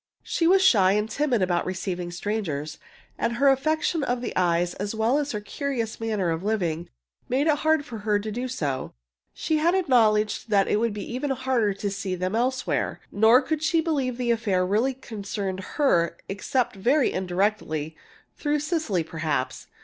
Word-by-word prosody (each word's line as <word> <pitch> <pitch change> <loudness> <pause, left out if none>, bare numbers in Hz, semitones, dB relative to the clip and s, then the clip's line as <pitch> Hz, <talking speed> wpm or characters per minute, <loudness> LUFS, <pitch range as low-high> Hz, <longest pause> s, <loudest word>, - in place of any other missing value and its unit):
She 330 - 0
was 380 +2 +5
shy 195 - +5
and 210 +1 +1
timid 245 -2 0
about 175 -1 +1
receiving 180 -1 -3
strangers, 175 -5 -3 0.4
and 235 - 0
her 275 +3 +4
affection 310 +3 +1
of 245 -1 0
the 245 - -5
eyes, 175 -1 +1
as 200 +3 -4
well 230 +6 +2
as 290 -1 -2
her 210 - -3
curious 230 +1 -3
manner 215 -6 -1
of 165 0 -2
living, 180 -6 -1 0.4
made 265 +4 +1
it 305 -2 +3
hard 315 -2 +2
for 230 -3 -7
her 210 0 +1
to 210 +1 -4
do 245 +4 -3
so. 145 - -3 0.4
She 315 - 0
had 330 +3 +3
to - - +3
acknowledge 225 - +2
that 200 -3 +3
it - - +2
would 230 0 0
be 205 - -5
even 270 +3 -2
harder 255 -6 0
to 200 0 -3
see 195 -1 -3
them 185 +3 -2
elsewhere. 255 +2 -1
Nor 220 +4 +5
could 315 -2 -2
she 320 +1 +2
believe 280 -6 0
that 250 - -3
the 240 - +2
affair 200 -6 +1
really 225 +8 +1
concerned 200 -5 -5 0.2
her, 170 - +2
except 240 +4 -1
very 255 +9 +2
indirectly 180 -5 -1 0.4
through 295 -1 0
Cecily, 300 - -1
perhaps. 155 -5 -3
220 Hz, 180 wpm, -25 LUFS, 185-265 Hz, 0.4 s, was